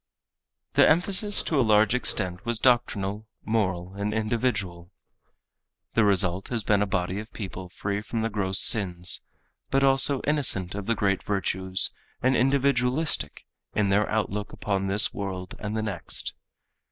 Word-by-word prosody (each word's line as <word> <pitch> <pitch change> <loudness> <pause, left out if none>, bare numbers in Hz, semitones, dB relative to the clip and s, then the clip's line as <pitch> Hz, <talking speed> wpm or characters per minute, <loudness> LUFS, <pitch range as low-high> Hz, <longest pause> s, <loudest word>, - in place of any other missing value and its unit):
The - - +6
emphasis 195 +5 +3
to 155 - 0
a - - +5
large 110 -2 +4
extent 90 -7 -1
was 120 -1 -1
doctrinal, 110 -4 +1 0.2
moral 95 -5 -1
and 100 +2 -3
individual. 105 -6 -2 1.0
The 115 - +3
result 95 -2 +1
has 115 -3 -2
been 105 +1 +2
a 105 - +1
body 90 0 -1
of 110 +2 -9
people 95 -3 -7
free 100 +2 -3
from 110 +1 -4
the 115 - -1
gross 95 -2 0
sins, 90 -5 +3 0.5
but 135 0 +2
also 135 0 +3
innocent 135 -12 +1
of 100 -1 -6
the 115 - +1
great 100 -4 0
virtues 95 -1 +1 0.3
and 130 +1 +2
individualistic 135 - 0 0.3
in 105 -2 +2
their 100 +2 +2
outlook 105 -1 -2
upon 95 -1 -2
this 100 +2 +2
world 95 -2 -5
and 105 +1 -4
the 110 - -1
next. 100 -6 -4
105 Hz, 150 wpm, -26 LUFS, 95-120 Hz, 1.0 s, The